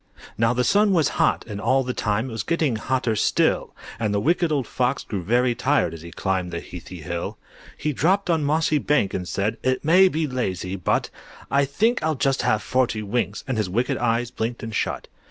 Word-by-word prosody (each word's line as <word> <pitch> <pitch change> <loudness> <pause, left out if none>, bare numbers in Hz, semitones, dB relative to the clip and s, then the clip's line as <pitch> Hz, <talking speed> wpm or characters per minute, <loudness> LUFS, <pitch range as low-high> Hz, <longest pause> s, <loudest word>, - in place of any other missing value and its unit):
Now 115 +1 +2
the 125 0 +1
sun 205 - +3
was 160 -5 +3
hot, - - +2
and 105 -2 -6
all 135 +3 +2
the 125 0 -3
time 110 +2 -1
It - - -7
was 110 - -2
getting 155 -2 0
hotter 125 0 0
still; - - +1 0.2
And 110 -2 0
the 100 - +1
Wicked 170 - +1
Old 140 -4 0
Fox 125 +3 -1
grew 100 -4 -4
very 120 +6 +2
tired 130 - +1
As 80 - -9
he 85 - -9
climbed 95 +1 -2
the 85 -1 -4
heathy 90 -1 -10
hill. 85 +2 -4 0.4
He 150 0 -1
dropped 190 +9 +2
on 165 -3 +1
mossy 155 +1 +2
bank, 145 -9 +1
and 90 -1 -3
said 100 +6 -1
"It 130 +2 0
may 185 +4 +6
be 160 -3 0
lazy 95 -9 -3
but 90 - 0 0.4
I 140 0 +3
think 220 - +1
I'll 160 -1 0
just 135 0 +1
have 110 -4 +1
forty 125 -4 0
winks," 115 +4 -2
And 130 -4 -1
his 105 -4 -1
wicked 120 +6 0
eyes 120 0 0
blinked 115 -1 -3
and 115 0 -5
shut. - - -2
125 Hz, 210 wpm, -23 LUFS, 105-145 Hz, 0.4 s, may